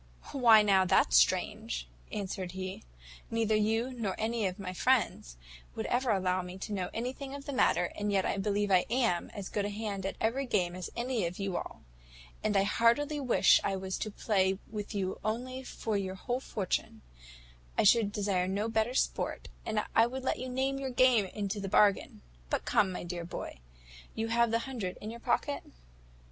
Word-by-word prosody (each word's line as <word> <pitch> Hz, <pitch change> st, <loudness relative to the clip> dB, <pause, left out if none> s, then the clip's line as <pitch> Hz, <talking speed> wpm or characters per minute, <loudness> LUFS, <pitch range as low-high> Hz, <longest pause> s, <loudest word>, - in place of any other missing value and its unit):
"`Why 230 Hz, -5 st, +6 dB
now, 195 Hz, -2 st, +5 dB
that's 180 Hz, -, +3 dB
strange,' -, -, +2 dB, 0.2 s
answered 190 Hz, -3 st, -4 dB
he; 190 Hz, 0 st, -5 dB, 0.5 s
`neither 225 Hz, -1 st, +1 dB
you, 225 Hz, +4 st, +1 dB
nor 220 Hz, -6 st, -2 dB
any 220 Hz, -1 st, 0 dB
of 185 Hz, -, -5 dB
my 185 Hz, -2 st, -5 dB
friends, 210 Hz, -, +1 dB, 0.4 s
would -, -, -3 dB
ever 250 Hz, +1 st, 0 dB
allow 185 Hz, -3 st, +1 dB
me 180 Hz, +1 st, -8 dB
to 205 Hz, +2 st, -5 dB
know 185 Hz, -3 st, -2 dB
anything 265 Hz, +4 st, -4 dB
of 280 Hz, 0 st, -9 dB
the 285 Hz, -, -4 dB
matter, 175 Hz, -8 st, +2 dB
and 205 Hz, 0 st, -1 dB
yet 195 Hz, -2 st, +2 dB
I -, -, 0 dB
believe 205 Hz, 0 st, 0 dB
I 185 Hz, -1 st, +4 dB
am 230 Hz, -8 st, +1 dB
as 200 Hz, -2 st, -5 dB
good 205 Hz, -, -2 dB
a 205 Hz, -, -1 dB
hand 205 Hz, -2 st, -3 dB
at 195 Hz, -, -4 dB
every 255 Hz, +5 st, 0 dB
game 180 Hz, -6 st, 0 dB
as 185 Hz, -1 st, -5 dB
any 235 Hz, -5 st, -1 dB
of 175 Hz, -, -7 dB
you 195 Hz, -2 st, -2 dB
all; -, -, -5 dB, 0.6 s
and 210 Hz, -2 st, +2 dB
I 195 Hz, -, +4 dB
heartily 235 Hz, +8 st, +2 dB
wish 260 Hz, -4 st, +5 dB
I 195 Hz, -, 0 dB
was 190 Hz, 0 st, -4 dB
to 215 Hz, -, -2 dB
play 195 Hz, -2 st, +1 dB
with 210 Hz, 0 st, -5 dB
you 190 Hz, -2 st, -2 dB
only 250 Hz, +5 st, -3 dB
for 225 Hz, -4 st, -4 dB
your 190 Hz, -1 st, -4 dB
whole 245 Hz, +6 st, -2 dB
fortune: 200 Hz, -, -3 dB, 0.7 s
I -, -, +4 dB
should 210 Hz, 0 st, +5 dB
desire 195 Hz, -3 st, 0 dB
no 205 Hz, +4 st, -1 dB
better 225 Hz, +2 st, 0 dB
sport, -, -, -1 dB, 0.2 s
and 215 Hz, -1 st, 0 dB
I 225 Hz, +1 st, +6 dB
would 260 Hz, +2 st, -6 dB
let -, -, 0 dB
you 255 Hz, +1 st, -4 dB
name 265 Hz, +2 st, -1 dB
your 270 Hz, -1 st, -3 dB
game 250 Hz, -4 st, +4 dB
into 200 Hz, +2 st, -4 dB
the 195 Hz, -1 st, -4 dB
bargain: 200 Hz, 0 st, +3 dB, 0.3 s
but -, -, -1 dB
come, 195 Hz, -2 st, +3 dB
my 180 Hz, -, -5 dB
dear 175 Hz, 0 st, -5 dB
boy, 170 Hz, -, -7 dB, 0.6 s
have 230 Hz, +1 st, +2 dB
you -, -, -4 dB
the 230 Hz, -, +2 dB
hundred 225 Hz, -9 st, -4 dB
in 215 Hz, -, -6 dB
your 235 Hz, -, -8 dB
pocket?" 265 Hz, +4 st, 0 dB
210 Hz, 195 wpm, -31 LUFS, 190-235 Hz, 0.7 s, `Why